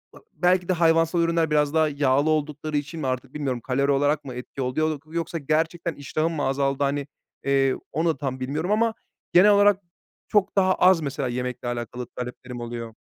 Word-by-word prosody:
ı - - -13 0.2
belki 180 0 +2
de 185 - +2
hayvansal 165 0 +3
ürünler 165 -2 +1
biraz 150 0 +2
daha 160 -1 +3
yağlı 140 +1 +2
oldukları 155 0 -1
için 150 +3 -4
mi 140 - -2
artık 130 +1 -3
bilmiyorum, 135 -5 -2
kalori 140 +3 +1
olarak 145 +1 +1
mı 130 - -6
etki 125 +2 -7
oluyodur 155 +4 -2
yoksa 170 0 -2
gerçekten 160 +2 -1
iştahım 155 +4 -2
mı 145 - -2
azaldı, 135 +1 0
hani, 140 0 -1 0.4
eee, 135 -1 +2 0.2
onu 165 0 0
tam 130 -2 -4
bilmiyorum 150 +8 -2
ama 225 +1 +2 0.4
genel 195 +4 +7
olarak 205 -1 +5 0.5
çok 205 -2 +1
daha 190 -1 +4
az, 180 -2 +5
mesela, 140 -2 -2
yemekle 125 0 -4
alakalı 120 +1 -4
taleplerim 125 0 -7
oluyor. 115 -1 -6
150 Hz, 180 wpm, -24 LUFS, 135-165 Hz, 0.5 s, genel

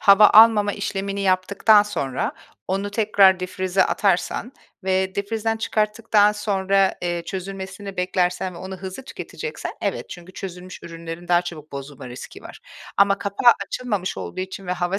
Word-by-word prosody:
hava 205 0 +8
almama 215 -2 +7
işlemini 200 0 -3
yaptıktan 195 +3 +4
sonra 140 -11 -3 0.4
onu 195 +2 -1
tekrar 200 -3 +4
dipfrize 185 +1 0
atarsan 205 +5 0 0.3
ve 190 0 0
dipfrizden 225 +2 -1
çıkarttıktan 215 -1 +2
sonra, 195 -2 +1
eee, 175 -1 -2
çözülmesini 195 +1 -6
beklersen 180 0 0
ve - - -9
onu 190 0 -7
hızlı 190 +6 -7
tüketeceksen, 465 - -6
evet. - - -3
Çünkü 175 +1 -10
çözünmüş 185 -1 -8
ürünlerin 165 +1 -8
daha 175 0 +4
çabuk 155 -4 -9
bozulma 140 -1 -8
riski 125 - -10
var. - - -11 0.4
Ama 200 0 +4
kapağı 200 +4 +4
açılmamış 205 - -3
olduğu 90 - -5
için 190 0 -6
ve 180 - -1
hava 180 +2 -1
190 Hz, 145 wpm, -22 LUFS, 180-205 Hz, 0.4 s, hava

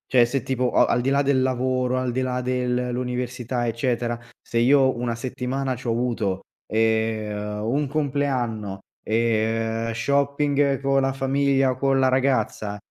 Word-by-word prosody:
Cioè 125 -3 +6
se 120 +1 -2
tipo 130 -1 0
a - - +5
al 120 - +2
di 130 - 0
là 140 +1 +3
del 140 -2 +2
lavoro, 130 0 0
al 130 -1 -1
di 125 - -2
là 125 -1 -1
del 125 0 -1
l'università, 125 0 -2
eccetera, 120 0 -1 0.2
se 115 - -4
io 130 +1 +4
una 120 -1 -2
settimana 130 +2 -3
c'ho 125 -1 -3
avuto, 115 -5 -1 0.3
ehm, 110 -1 0
uhm, 115 +3 -1
un 145 +1 +1
compleanno, 130 -8 -1 0.2
e, 115 0 0
uhm, 115 - -2
shopping 140 +2 +1
con 135 0 +2
la 135 0 0
famiglia 135 0 +2
o 130 - -5
con 135 0 +2
la 130 0 +4
ragazza, 130 -6 0
125 Hz, 165 wpm, -24 LUFS, 115-135 Hz, 0.3 s, Cioè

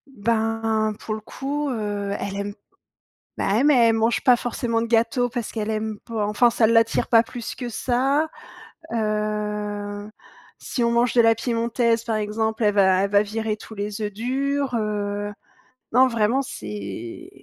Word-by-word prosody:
Ben, 220 0 0
pour 215 - -4
le 215 - -4
coup, 285 +6 -3
heu, 205 -4 -2
elle 195 - -4
aime 200 0 -3 0.8
bah 195 - 0
ouais 225 +5 +3
mais 295 -1 +5
elle 225 - +4
mange 225 +1 +2
pas 250 -2 +6
forcément 235 -1 -1
de 230 - -2
gâteau, 235 +2 +2
parce 240 -2 -4
qu'elle 215 -1 -2
aime 215 -1 -2
pas, 220 -3 -2
enfin 210 +3 +4
ça 230 -1 +3
l'attire 230 0 +3
pas 230 -1 +6
plus 240 0 -7
que 245 -2 -5
ça. 270 +6 +1 0.7
Heu, 210 -1 -2 0.5
si 240 - -2
on 235 - +2
mange 235 +1 +2
de 245 - +6
la 225 0 +5
piémontaise 230 0 0
par 225 -2 -1
exemple, 220 +1 -1
elle 205 -1 +3
va 190 -2 +4
elle 200 - -1
va 200 0 +5
virer 215 +1 -2
tous 220 +1 -11
les 205 +1 -4
œufs 210 -1 -2
durs, 270 +5 -1
heu. 205 -1 -2 0.6
Non 255 +3 +6
vraiment 230 +2 +1
c'est 105 - -7
225 Hz, 170 wpm, -23 LUFS, 210-235 Hz, 0.8 s, pas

